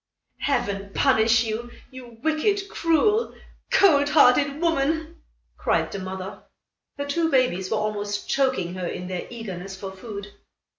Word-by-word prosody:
"Heaven 200 -8 -1
punish 225 -3 +4
you, 230 +2 -4 0.2
you 245 -3 -11
wicked, 390 +6 +1
cruel, 410 +8 +2 0.3
cold 290 -7 +5
hearted 285 0 +4
woman," 320 0 0 0.4
cried - - 0
the 200 - -4
mother. 190 +1 -6 0.6
Her 285 - -3
two 325 +3 0
babies 250 - +1
were 220 - 0
almost 205 -1 -2
choking 260 -11 0
her 185 -1 -4
in 180 - -5
their 180 -1 -4
eagerness 195 -5 -7
for 190 0 -7
food. 200 0 -8
240 Hz, 135 wpm, -24 LUFS, 200-290 Hz, 0.6 s, cold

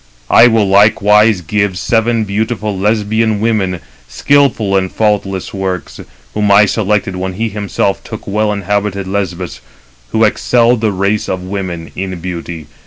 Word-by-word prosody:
I 115 - +7
will 110 -3 +2
likewise 105 0 +4
give 100 +2 -1
seven 115 +3 +1
beautiful 105 +1 -2
Lesbian 110 +2 0
women, 100 -5 -1 0.3
skilful 115 - +1
in 95 -1 +1
faultless 100 -3 -1
works; 95 -3 -4 0.3
whom 105 -1 0
I 100 +1 +6
selected 105 -2 -1
when 95 0 -3
he 110 +4 -2
himself 100 -1 -2
took 110 - -8
well 105 +1 0
inhabited 100 -1 -2
Lesbos, 95 -3 -4 0.5
who 110 - +1
excel 120 +2 +3
the 110 -2 0
race 100 +2 -1
of 95 -1 -3
women 90 -4 -5
in 95 -2 -4
beauty. 85 -2 -6
100 Hz, 140 wpm, -14 LUFS, 95-110 Hz, 0.5 s, I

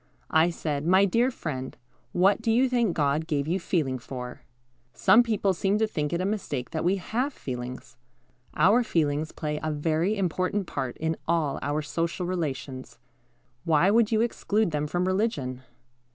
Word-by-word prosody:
I 160 +2 +4
said, 150 -3 -3
"My 190 +2 +5
dear 230 +6 +2
friend, 130 - -5 0.3
what 195 +4 +3
do 225 - -1
you 250 +4 +4
think 235 -7 +1
God 150 +1 +1
gave 145 -3 -1
you 180 +4 0
feeling 150 -8 -1
for?" 125 0 -7 0.5
Some 225 - +6
people 210 -5 +1
seem 195 +3 +1
to 220 - +2
think 150 -8 -2
it 170 - 0
a 185 - -1
mistake 200 - -3
that 160 - -2
we 180 +3 +3
have 235 - -2
feelings. 125 - -7 0.6
Our 200 +10 +5
feelings 155 -5 0
play 150 -1 -3
a 155 - -2
very 160 +7 0
important 185 +2 0
part 130 -6 -4
in 160 0 -1
all 160 -4 +1
our 150 +2 -1
social 170 +4 -2
relations. 140 -8 -4 0.7
Why 165 +4 +3
would 230 0 +3
you 220 -1 +3
exclude 220 -4 0
them 150 0 -1
from 175 +4 -1
religion? 185 - -1
170 Hz, 165 wpm, -27 LUFS, 145-200 Hz, 0.7 s, Some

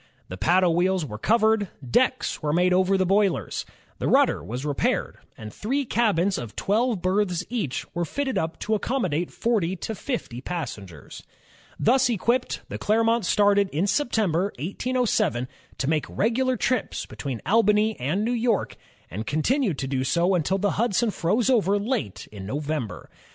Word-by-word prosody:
The 90 - -6
paddle 180 - +3
wheels 180 0 +1
were 105 -6 -7
covered, 220 - +3 0.2
decks 255 - +1
were 150 -2 0
made 180 +2 +3
over 190 +1 +3
the 190 - +2
boilers, 190 - +1 0.3
the - - -1
rudder - - +3
was 120 - -5
repaired, 145 -3 -1 0.2
and 105 -1 -9
three 270 +6 -1
cabins 200 -6 +1
of 120 -4 -8
twelve 220 -1 0
berths 185 -2 +1
each 215 - -2
were 175 - -1
fitted 265 - -2
up 165 -3 -2
to 220 - -1
accommodate 190 - -1
forty 205 -6 0
to 220 - -5
fifty 210 - -4
passengers. 100 - -7 0.6
Thus 250 +2 +3
equipped, 235 +3 0
the - - -6
Clermont 225 -1 +2
started 205 -1 +3
in 165 +4 0
September, 200 - +1
1807, 200 - 0 0.3
to 135 - -2
make 155 -1 0
regular 250 +4 +1
trips 255 -3 -1
between 135 -5 -5
Albany 215 0 +3
and 170 - -1
New 235 - 0
York, 235 -3 0 0.3
and 105 +6 -5
continued 190 - +1
to 135 - -3
do 130 -1 -1
so 170 +7 +2
until 180 +2 +1
the 205 +1 +1
Hudson 235 0 +1
froze 210 +7 0
over 205 -6 +3
late 205 - -3
in 100 -2 -8
November. 145 -2 -4
190 Hz, 155 wpm, -25 LUFS, 155-225 Hz, 0.6 s, paddle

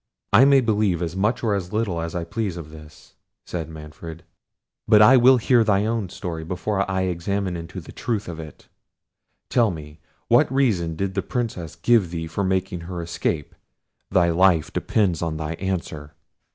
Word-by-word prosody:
"I 130 - +8
may 140 -1 +6
believe 105 -6 +1
as 85 +1 -4
much 105 +6 0
or 110 -3 +1
as 90 -3 -3
little 105 -6 -1
as 85 0 -5
I 85 - -2
please 100 0 -3
of 75 -3 -9
this," 75 -1 -15 0.3
said 80 -3 -5
Manfred; 80 +1 -10 0.6
"but 105 -1 +6
I 105 +5 +8
will 130 +1 +6
hear 120 0 +3
thy 105 -2 +2
own 110 -4 -1
story 85 -4 -5
before 95 +4 -2
I 95 0 0
examine 95 +1 -2
into 85 -1 -7
the - - -11
truth 110 -4 -3
of 85 -2 -6
it. 75 -2 -11 0.8
Tell 120 -3 +3
me, 75 -3 -8 0.3
what - - +4
reason 105 -12 +1
did 95 +3 -2
the 100 - -1
Princess 95 -11 -4
give 100 +2 +3
thee 80 -1 -4
for 80 +5 -3
making 95 -1 -1
her 85 +1 -6
escape? 85 -2 -3 0.6
thy 85 -1 +3
life 85 -2 +3
depends 95 -7 0
on 80 -2 -2
thy 80 +1 -3
answer." 85 -6 -4
90 Hz, 180 wpm, -23 LUFS, 80-105 Hz, 0.8 s, I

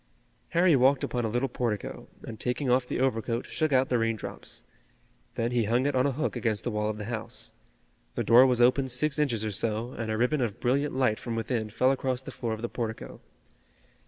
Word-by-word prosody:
Harry 175 -2 +4
walked 130 +1 +4
upon 120 -1 -1
a - - -1
little 120 +4 0
portico, 115 -6 -3 0.2
and 110 -2 -8
taking 125 +2 -1
off 125 0 +2
the - - -2
overcoat 120 -2 0
shook 155 -2 -1
out 130 0 +3
the 125 - +2
rain 115 0 +1
drops. 110 - -6 0.7
Then 115 +1 -1
he 120 -2 +1
hung 120 +5 +1
it 145 - +1
on 130 +2 +3
a - - +1
hook 155 +5 -2
against 110 -4 -1
the 120 - -2
wall 105 0 -1
of 105 - -3
the 105 - -5
house. 115 -1 -3 0.6
The - - -1
door 125 +3 +7
was 125 -2 +1
open 130 +2 +4
six 140 +4 0
inches 120 -8 0
or 110 - -2
so, 110 +4 -1
and 115 -3 -5
a 110 - -1
ribbon 125 +5 +1
of 115 -5 -2
brilliant 140 +4 0
light 125 -5 +2
from 115 -2 -4
within 115 -1 -2
fell 130 +4 +2
across 130 -1 -1
the - - -7
floor 115 -3 -3
of 110 +1 -6
the - - 0
portico. 115 -2 -5
120 Hz, 220 wpm, -28 LUFS, 115-130 Hz, 0.7 s, door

